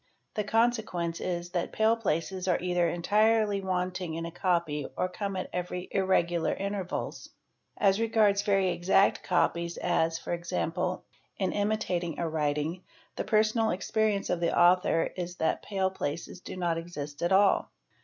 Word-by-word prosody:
The 210 - -1
consequence 215 -7 0
is 175 -1 -3
that 175 -2 -2
pale 220 +1 +3
places 185 -3 -2
are 180 - +3
either 175 -1 +1
entirely 210 +3 +2
wanting 180 -2 -2
in 165 0 -3
a 170 - -5
copy 170 -5 0
0 185 - 0
come 200 +1 -4
at 185 - -3
every 180 0 -4
irregular 175 -3 +1
intervals. 195 -2 -4 0.5
As 195 0 +3
regards 215 -3 +3
very 195 -2 +2
exact 180 +3 +3
copies 170 -1 0
as, 165 -2 +1
¢.g 175 +1 -2 0.4
in 190 -2 0
imitating 200 -5 -1
a 170 - -1
writing, 155 +2 -1 0.3
the - - -2
personal 220 +1 +2
experience 205 +2 0
of 175 - 0
the 170 -1 0
author 175 -1 +4
is 175 -1 -4
that 160 - 0
pal 190 -2 -1
places 165 0 -4
do 185 - -8
not 170 -2 0
exist 150 -4 -7
at 175 - 0
all. 195 +1 +4
180 Hz, 150 wpm, -29 LUFS, 170-200 Hz, 0.5 s, author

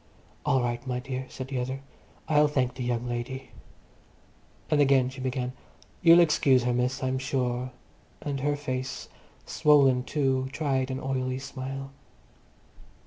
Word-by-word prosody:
"All 135 -4 +3
right, 120 +1 -3
my 125 -1 -1
dear," 130 0 -5
said 130 0 -7
the 130 -2 -2
other. 130 +2 -3 0.5
"I'll 150 -1 +5
thenk 130 -4 0
the 130 0 -5
young 120 0 -1
lady." 120 +2 -4 1.2
And 150 -1 +4
again 135 -2 +4
she 130 0 -9
began, 125 -1 -2 0.5
"You'll 170 0 +8
excuse 140 -6 +4
her, 125 0 +1
miss, 125 +2 0
I'm 130 0 0
sure," 125 -1 -1 0.5
and 140 -2 -3
her 145 +2 +1
face, 130 -2 -4 0.4
swollen 140 -4 +4
too, 130 -2 0
tried 135 -3 0
an 130 0 -3
oily 130 -1 -2
smile. 135 +1 -6
130 Hz, 140 wpm, -27 LUFS, 125-135 Hz, 1.2 s, You'll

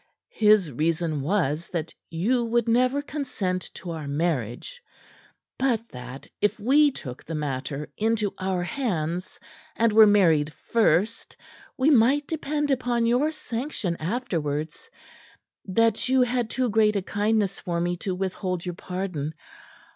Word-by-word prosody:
His 210 -7 +4
reason 155 +2 -1
was 165 -1 0
that 170 -2 -4 0.2
you 220 +10 +1
would 235 0 +1
never 255 +4 +2
consent 215 - -3
to 175 - -7
our 160 -3 -5
marriage; 145 - -2 0.8
but 235 -4 +1
that 125 +2 -9 0.2
if 210 - +1
we 285 +7 +5
took 130 - -8
the 165 - -5
matter 145 0 -3
into 215 -2 0
our 185 -1 -1
hands, 180 - -3 0.4
and 230 -1 +2
were 220 0 +8
married 165 -7 +4
first, 225 +1 0 0.4
we 270 +4 +4
might 270 +3 +4
depend 295 -1 -2
upon 245 -3 +1
your 250 +6 +3
sanction 235 - -3
afterwards; 160 - -3 0.8
that 225 +4 +1
you 260 -1 +5
had 245 -2 -1
too 255 +1 0
great 215 0 +3
a 200 - 0
kindness 205 0 0
for 170 -3 -2
me 175 +1 0
to 185 +1 -3
withhold 185 -1 -3
your 180 - -3
pardon. 180 -5 -4
200 Hz, 135 wpm, -25 LUFS, 165-240 Hz, 0.8 s, were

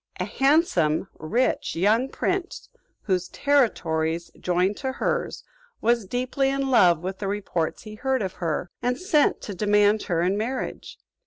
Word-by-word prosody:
A - - -1
handsome, 235 - +2
rich, 235 +11 0
young 215 +9 +2
prince, 370 +4 -3 0.3
whose 185 -3 0
territories 170 - 0
joined 180 +3 +1
to 265 -1 -3
hers, - - -2 0.4
was 235 -3 +1
deeply 255 +4 0
in 275 0 -1
love 175 -9 +5
with 190 +1 -4
the 200 - -3
reports 195 -5 -2
he 215 - -9
heard 260 +2 -1
of 190 - -3
her, 170 +1 -2
and 250 0 0
sent 310 -4 +2
to 205 - -6
demand 205 +2 +3
her 170 -1 +1
in 190 +3 +1
marriage. 250 +5 -4
210 Hz, 150 wpm, -25 LUFS, 180-260 Hz, 0.4 s, love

